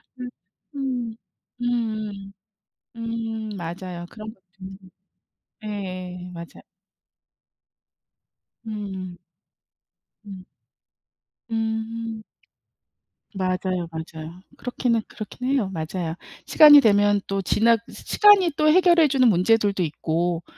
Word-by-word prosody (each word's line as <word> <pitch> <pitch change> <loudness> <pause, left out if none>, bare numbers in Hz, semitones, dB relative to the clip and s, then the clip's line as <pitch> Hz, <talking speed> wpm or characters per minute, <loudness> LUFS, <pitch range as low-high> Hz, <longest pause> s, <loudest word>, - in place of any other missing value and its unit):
음 250 -1 -6 0.5
음 250 -5 -3 0.5
음 215 -5 -3 0.6
음 225 -1 -4
맞아요. 175 0 -6
그런 220 0 -9
것도 190 - -33 0.2
있는 190 0 -9 0.9
예 185 -3 -6
맞아요. 170 0 -10 2.0
음. 195 -4 -6 1.1
음. 190 -2 -10 1.0
음. 225 0 -3 1.1
맞아요, 185 -1 -1
맞아요. 160 +1 -8 0.2
그렇기는 245 -2 -1
그렇긴 250 +4 -6
해요. 260 -8 +1
맞아요. 165 0 -4 0.3
시간이 295 -2 +9
되면 205 -3 +4
또 195 0 -1
지나 230 +5 +3
시 - - -12
시간이 410 -5 +5
또 305 +1 +3
해결해 345 -1 +5
주는 260 -2 +4
문제들도 200 0 +3
있고 165 +2 -1
210 Hz, 180 characters per minute, -23 LUFS, 185-230 Hz, 2.0 s, 시간이